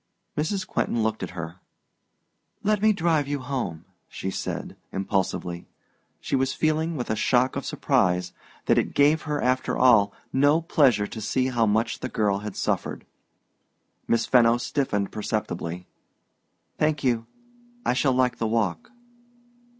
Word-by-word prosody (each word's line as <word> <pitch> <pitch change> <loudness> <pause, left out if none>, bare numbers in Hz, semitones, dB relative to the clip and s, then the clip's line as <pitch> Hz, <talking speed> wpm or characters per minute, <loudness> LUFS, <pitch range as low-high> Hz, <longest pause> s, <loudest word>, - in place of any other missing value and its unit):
Mrs. 190 +6 -1
Quentin 115 - -1
looked 110 0 -1
at 95 - -3
her. 85 +1 -6 1.1
"Let 210 -1 +2
me 215 0 +5
drive 165 -7 +1
you 145 0 -1
home," 130 - -4 0.2
she 95 - -4
said, - - -4 0.2
impulsively. 95 -3 -2 0.5
She - - -2
was 135 0 +1
feeling, 160 +1 0
with 120 -3 -3
a - - +1
shock 125 +4 +2
of - - -4
surprise, 90 0 +1 0.3
that - - +4
it - - -3
gave 150 +2 +4
her, 150 -1 0
after 130 0 0
all, 115 -6 +5 0.2
no 145 +4 +4
pleasure 135 -10 +3
to 110 +2 -7
see 130 +5 0
how 120 -3 +2
much 110 +2 +1
the - - -4
girl 100 -2 +1
had 105 -1 -6
suffered. - - -2 1.0
Miss 115 0 +2
Fenno 120 -2 +5
stiffened 120 -5 -1
perceptibly. 90 -5 -3 0.9
"Thank 155 -1 +1
you; 115 -3 +1 0.6
I - - +3
shall 130 +1 +2
like 125 -1 +1
the 115 - 0
walk." 110 - -1
120 Hz, 145 wpm, -25 LUFS, 105-145 Hz, 1.1 s, me